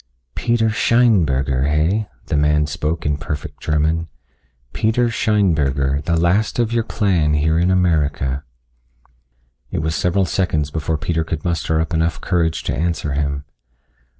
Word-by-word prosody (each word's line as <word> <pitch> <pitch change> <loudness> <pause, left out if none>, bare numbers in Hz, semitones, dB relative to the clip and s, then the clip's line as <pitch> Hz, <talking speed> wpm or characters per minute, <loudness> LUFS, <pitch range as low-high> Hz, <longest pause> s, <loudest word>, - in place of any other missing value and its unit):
"Peter 115 +5 +1
Scheinberger, 80 - +2
heh?" 85 +9 +1 0.2
the - - -2
man 75 +1 +2
spoke 75 +2 -3
in 75 0 +1
perfect 75 -1 -6
German. 80 +2 0 0.7
"Peter 115 +5 +1
Scheinberger, 75 - +1
the 85 0 +1
last 95 +6 +1
of 120 -1 0
your 115 - +2
clan 90 -10 +1
here 80 +2 +2
in 90 +2 +2
America." 75 -7 +1 1.3
It - - -3
was 80 0 -1
several 90 +3 +1
seconds 80 -6 -1
before 80 +1 -2
Peter 80 +1 -1
could 80 0 -5
muster 80 -2 0
up 80 +2 -2
enough 80 +1 0
courage 85 -3 0
to - - -2
answer 80 -1 -1
him. 70 0 -2
80 Hz, 140 wpm, -19 LUFS, 75-90 Hz, 1.3 s, Scheinberger